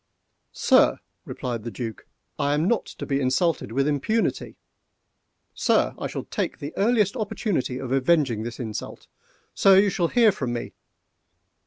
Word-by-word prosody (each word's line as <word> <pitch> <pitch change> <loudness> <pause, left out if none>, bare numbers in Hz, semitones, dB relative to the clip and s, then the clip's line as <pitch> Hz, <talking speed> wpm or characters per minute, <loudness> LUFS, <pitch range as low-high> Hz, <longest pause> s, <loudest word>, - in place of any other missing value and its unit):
"Sir!" - - +4 0.3
replied 120 -3 -4
the 115 - -5
Duc, 115 -3 -7 0.3
"I 145 +1 +1
am 155 +4 +1
not 235 +1 0
to - - -8
be 140 -1 0
insulted 130 - 0
with 135 +4 +1
impunity!—Sir! 150 +11 -3
I - - -4
shall - - -5
take - - -3
the 145 -1 -7
earliest 210 -1 +2
opportunity 205 - -2
of 130 -1 -6
avenging 135 -4 +2
this 120 +2 -6
insult!—Sir! 125 - -1
you 200 0 +4
shall 175 -2 0
hear 230 +2 +4
from 130 -9 -3
me! 120 - -5
145 Hz, 140 wpm, -24 LUFS, 125-195 Hz, 0.3 s, Sir